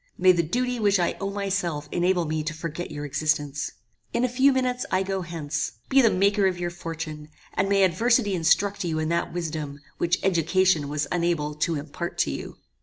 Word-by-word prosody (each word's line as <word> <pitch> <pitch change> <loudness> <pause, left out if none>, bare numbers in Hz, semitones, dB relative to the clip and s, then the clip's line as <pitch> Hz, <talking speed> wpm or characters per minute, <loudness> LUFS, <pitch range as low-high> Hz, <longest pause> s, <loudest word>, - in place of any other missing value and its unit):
May 185 - +6
the 175 -1 +2
duty 245 +9 -1
which 205 -2 +3
I 175 - +1
owe 195 - -1
myself 190 -7 -2
enable 175 0 +2
me 155 0 -1
to 155 0 -3
forget 165 +1 -5
your 145 0 -5
existence. 145 -1 -1 0.4
In 240 - +2
a - - +2
few 260 +3 +4
minutes 255 -1 0
I 185 +1 +2
go 195 0 -2
hence. 155 -4 -3 0.2
Be 270 0 +6
the 230 - +5
maker 200 +1 +3
of 180 -2 -1
your 175 0 -2
fortune, 160 -3 -6 0.2
and 195 +1 0
may 200 -1 +4
adversity 215 +4 +3
instruct 195 +4 +2
you 165 -3 -1
in 155 0 -1
that 170 0 0
wisdom, 155 -4 -4 0.2
which 175 +1 +2
education 175 -3 +2
was 150 0 -1
unable 170 -4 0
to 155 +2 0
impart 155 +4 -5
to 70 - +1
you." - - -6
175 Hz, 195 wpm, -25 LUFS, 155-195 Hz, 0.4 s, May